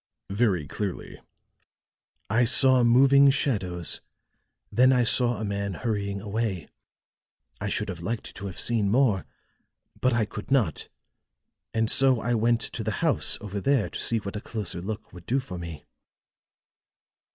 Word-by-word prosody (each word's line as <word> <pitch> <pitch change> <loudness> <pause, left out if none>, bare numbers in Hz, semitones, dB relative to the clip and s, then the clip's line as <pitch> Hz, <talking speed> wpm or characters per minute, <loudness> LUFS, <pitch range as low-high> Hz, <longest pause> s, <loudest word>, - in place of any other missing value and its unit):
"Very 100 -7 +1
clearly." 95 +6 -5 1.1
"I 115 +4 +2
saw 130 +1 +5
moving 135 +4 +6
shadows, 95 - 0 0.7
then 130 +2 +5
I 125 -2 +3
saw 120 0 +2
a 110 - -3
man 100 -1 -3
hurrying 100 -3 -3
away. 100 -4 -3 0.9
I - - -3
should - - -1
have 90 - -6
liked 110 +6 -5
to 100 -1 -6
have 95 - -7
seen 110 -4 0
more, 115 -4 +2 0.7
but 130 - +2
I 115 -2 +1
could 105 - -9
not 120 - 0 0.8
and 110 0 0
so 130 +1 +4
I 120 +3 -1
went 115 +1 +2
to 115 - -4
the 110 0 -2
house 160 - +1
over 100 -2 -5
there 135 -3 +1
to - - -6
see 115 - -1
what 100 -1 -6
a 105 - -4
closer 100 -7 -5
look 105 +1 -6
would 90 -1 -13
do 130 +3 +1
for 90 -9 -7
me." 85 -3 -8
110 Hz, 150 wpm, -26 LUFS, 100-120 Hz, 1.1 s, moving